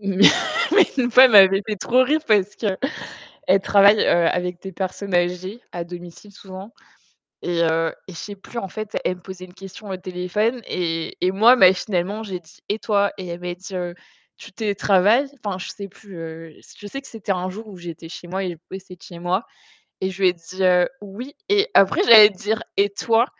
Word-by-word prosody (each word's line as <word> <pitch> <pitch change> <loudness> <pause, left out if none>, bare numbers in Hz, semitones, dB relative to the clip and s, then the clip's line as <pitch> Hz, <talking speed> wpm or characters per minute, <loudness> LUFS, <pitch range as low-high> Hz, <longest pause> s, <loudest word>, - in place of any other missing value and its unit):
Mais 195 -1 +3
une 250 -2 0
fois 255 +3 +8
elle 250 - +5
m'avait 195 -1 +7
fait 215 -1 -3
trop 250 +6 +2
rire 305 +4 +1
parce 205 -2 +2
que 225 - -5 0.8
elle 195 +1 +4
travaille, 200 +2 +5
heu, 170 -1 +3
avec 180 0 -2
des 190 - -8
personnes 190 +1 -4
âgées 180 +4 -1
à 175 - -5
domicile 175 +3 -11
souvent 195 +1 -11 0.7
et 175 -1 -1
heu 165 0 0 0.2
et - - -8
je 170 - -11
sais 205 +4 -8
plus 220 +4 -8
en 195 - -5
fait, 215 +2 -6
elle 185 - 0
me - - -21
posait 185 0 -10
une 180 - -18
question 195 +2 -12
au 190 - -4
téléphone 185 +6 -2
et 165 -2 -3
et 180 - +2
moi, 220 +6 +6
machinalement, 190 0 +2
j'ai 190 -4 -6
dit: 165 -1 -21
«Et 210 - -1
toi?» 200 -2 +1
et 185 -2 -7
elle 170 0 -6
m'a 180 0 -5
dit, 190 +2 -12
heu: 175 -1 -4 0.4
«Tu - - -13
télétravailles?» 210 +4 +2
enfin, 200 -3 -3
je - - -7
sais 200 - -8
plus, 200 -1 -15
heu, 165 -1 -9 0.3
je 205 - -9
sais 275 - -6
que 275 - -15
c'était 220 -3 -5
un 185 0 -2
jour 215 +4 -9
où 200 -3 -11
j'étais 170 -2 -9
chez 175 +1 -10
moi 190 +2 -3
et 185 - -3
je 170 - -10
bossais 190 -1 -10
de 175 - -33
chez 170 - -11
moi 180 +5 -1 0.6
et 190 - -1
je 190 +1 -8
lui 185 - +6
ai - - -4
dit, 180 +2 -8
heu: 180 -1 +4
«Oui». 220 +8 -10
Et 410 +2 +2
après 195 -1 +4
j'allais 215 -3 +9
dire: 210 +2 -3 0.2
«Et 200 +1 +2
toi?» 225 +4 +1
190 Hz, 215 wpm, -21 LUFS, 180-210 Hz, 0.8 s, j'allais